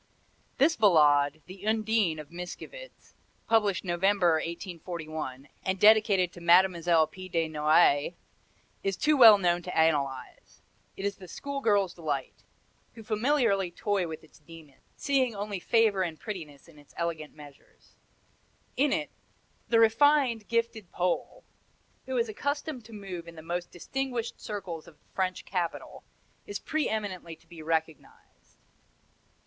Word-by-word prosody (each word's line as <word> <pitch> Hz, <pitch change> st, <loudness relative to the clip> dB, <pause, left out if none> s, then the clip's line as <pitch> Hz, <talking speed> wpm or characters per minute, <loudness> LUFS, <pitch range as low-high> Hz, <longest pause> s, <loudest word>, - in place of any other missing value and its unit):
This 310 Hz, +5 st, +4 dB
Ballade, 150 Hz, -7 st, +4 dB
the 185 Hz, +1 st, -12 dB
"Undine" 220 Hz, -6 st, +1 dB
of 150 Hz, 0 st, -10 dB
Mickiewicz, 180 Hz, -, -10 dB, 0.3 s
published 210 Hz, -4 st, +2 dB
November, 175 Hz, -1 st, +2 dB
1841, 160 Hz, -6 st, -6 dB, 0.2 s
and 190 Hz, 0 st, -1 dB
dedicated 210 Hz, -4 st, +5 dB
to 175 Hz, -, -12 dB
Mlle. 170 Hz, -2 st, +4 dB
P. 185 Hz, +4 st, -11 dB
de 165 Hz, -2 st, 0 dB
Noailles, 155 Hz, 0 st, +3 dB, 0.7 s
is 195 Hz, -1 st, -2 dB
too 305 Hz, 0 st, +3 dB
well 225 Hz, -6 st, +9 dB
known 175 Hz, -2 st, +1 dB
to 180 Hz, +1 st, -6 dB
analyze. 140 Hz, -5 st, -1 dB, 0.3 s
It 195 Hz, -, -4 dB
is 200 Hz, -1 st, -2 dB
the 185 Hz, -, -12 dB
schoolgirls' 210 Hz, -7 st, -1 dB
delight, 145 Hz, -6 st, -4 dB, 0.5 s
who 225 Hz, -, -11 dB
familiarly 215 Hz, -4 st, +1 dB
toy 195 Hz, 0 st, -1 dB
with 160 Hz, -1 st, -8 dB
its 160 Hz, -, -20 dB
demon, 150 Hz, -2 st, -15 dB, 0.2 s
seeing 260 Hz, -5 st, 0 dB
only 200 Hz, -1 st, -4 dB
favor 220 Hz, -1 st, +2 dB
and 165 Hz, -4 st, -3 dB
prettiness 160 Hz, -10 st, -8 dB
in 155 Hz, -3 st, -17 dB
its 145 Hz, -, -21 dB
elegant 165 Hz, -3 st, -4 dB
measures. 145 Hz, -2 st, -17 dB, 0.8 s
In 285 Hz, +1 st, +2 dB
it -, -, -1 dB, 0.6 s
"the 230 Hz, -, +4 dB
refined, 230 Hz, 0 st, +3 dB
gifted 230 Hz, -4 st, -2 dB
Pole, 180 Hz, -, -2 dB, 0.6 s
who 260 Hz, -1 st, -2 dB
is 235 Hz, -1 st, +1 dB
accustomed 285 Hz, +4 st, -3 dB
to 230 Hz, -, -14 dB
move 185 Hz, -5 st, -7 dB
in 170 Hz, -, -11 dB
the 160 Hz, -, -11 dB
most 175 Hz, +1 st, -4 dB
distinguished 245 Hz, +4 st, -4 dB
circles 185 Hz, -6 st, -6 dB
of 165 Hz, -, -16 dB
the -, -, -38 dB
French 185 Hz, -1 st, -2 dB
capital, 175 Hz, -3 st, -4 dB, 0.4 s
is 205 Hz, -, -4 dB
pre 310 Hz, +7 st, -2 dB
eminently 190 Hz, -6 st, -4 dB
to -, -, -28 dB
be 170 Hz, -2 st, -12 dB
recognized." 160 Hz, 0 st, -5 dB
185 Hz, 140 wpm, -28 LUFS, 165-220 Hz, 0.8 s, well